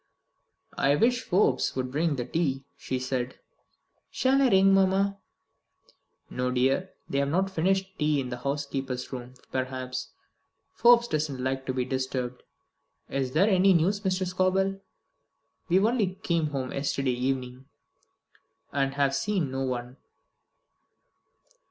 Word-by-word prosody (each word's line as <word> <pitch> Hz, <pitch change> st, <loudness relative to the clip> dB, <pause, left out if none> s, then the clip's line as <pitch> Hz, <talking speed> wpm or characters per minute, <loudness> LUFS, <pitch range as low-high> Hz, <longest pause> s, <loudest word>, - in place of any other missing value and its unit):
"I 140 Hz, +1 st, +4 dB
wish 245 Hz, +8 st, +2 dB
Forbes 180 Hz, -, +1 dB
would 130 Hz, -1 st, -2 dB
bring 155 Hz, +2 st, +1 dB
the 120 Hz, -2 st, -3 dB
tea," 135 Hz, -1 st, -1 dB
she 130 Hz, -, -3 dB
said. 130 Hz, 0 st, -3 dB, 0.7 s
"Shall 265 Hz, +1 st, +2 dB
I 265 Hz, -, +5 dB
ring, 195 Hz, -1 st, +5 dB
mamma?" 195 Hz, +1 st, +2 dB, 1.1 s
"No, 125 Hz, 0 st, -2 dB
dear. 135 Hz, +9 st, +1 dB, 0.2 s
They 140 Hz, -, -1 dB
have 140 Hz, 0 st, +1 dB
not 190 Hz, +5 st, +1 dB
finished 190 Hz, +2 st, 0 dB
tea 150 Hz, -1 st, +2 dB
in 130 Hz, -2 st, -3 dB
the 125 Hz, -, -4 dB
housekeeper's 135 Hz, -1 st, -3 dB
room, 125 Hz, 0 st, -7 dB, 0.2 s
perhaps. 130 Hz, -1 st, -3 dB, 0.6 s
Forbes 240 Hz, 0 st, +5 dB
doesn't 150 Hz, -, -2 dB
like 130 Hz, 0 st, -2 dB
to 130 Hz, -, 0 dB
be 125 Hz, -1 st, 0 dB
disturbed. 130 Hz, -1 st, -3 dB, 0.7 s
Is 130 Hz, -2 st, -2 dB
there 190 Hz, +7 st, +4 dB
any 195 Hz, -1 st, +5 dB
news, 185 Hz, +5 st, +2 dB
Mr. 190 Hz, -2 st, 0 dB
Scobel? 185 Hz, +2 st, +1 dB, 0.9 s
We 175 Hz, -, +4 dB
only 210 Hz, -2 st, +2 dB
came 170 Hz, -3 st, +1 dB
home 135 Hz, -3 st, -3 dB
yesterday 140 Hz, -1 st, -1 dB
evening, 125 Hz, 0 st, -3 dB, 1.1 s
and 135 Hz, 0 st, 0 dB
have 140 Hz, -1 st, +2 dB
seen 175 Hz, -1 st, -1 dB
no 135 Hz, 0 st, -3 dB
one." 125 Hz, -1 st, -3 dB
140 Hz, 135 wpm, -27 LUFS, 130-190 Hz, 1.1 s, I